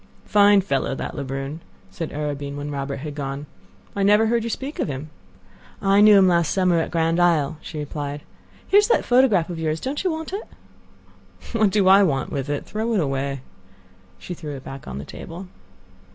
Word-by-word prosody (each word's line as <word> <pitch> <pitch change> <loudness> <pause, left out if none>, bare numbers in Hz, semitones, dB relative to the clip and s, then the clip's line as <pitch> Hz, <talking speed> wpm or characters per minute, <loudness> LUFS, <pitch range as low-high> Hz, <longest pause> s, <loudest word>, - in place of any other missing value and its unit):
"Fine 205 -1 +5
fellow, 135 -7 -1
that - - -5
Lebrun," 135 +2 -4 0.3
said 165 - -5
Arobin 145 -1 -4
when 145 +1 -5
Robert 140 0 -3
had 150 0 -5
gone. 140 0 -5 0.5
"I 200 - -1
never 210 +3 +5
heard 230 0 +1
you 230 - -3
speak 270 +6 -5
of - - 0
him." 145 +2 -6 0.7
"I 195 +1 +4
knew 210 -1 +8
him 190 -1 +6
last 170 -3 +2
summer 180 -3 +2
at 165 - -1
Grand 165 0 +1
Isle," 160 -4 +2
she 160 - -8
replied. 145 -1 -5 0.5
"Here 400 - +6
is 415 - +2
that 475 - +2
photograph 235 -9 +3
of 170 - -5
yours. 160 0 -1
Don't 275 - -3
you 375 - +1
want 320 +1 -5
it?" 405 - -3 1.1
"What 220 -3 +3
do 195 -1 +2
I 195 +1 +8
want 140 -9 0
with 140 -1 -3
it? 145 - -2
Throw 220 +2 -2
it - - +2
away." 135 -3 -2 0.8
She 180 - -7
threw 155 -4 -7
it 130 - -9
back 135 0 -9
on 65 - -6
the 70 - -6
table. 175 - -9
165 Hz, 195 wpm, -23 LUFS, 145-205 Hz, 1.1 s, knew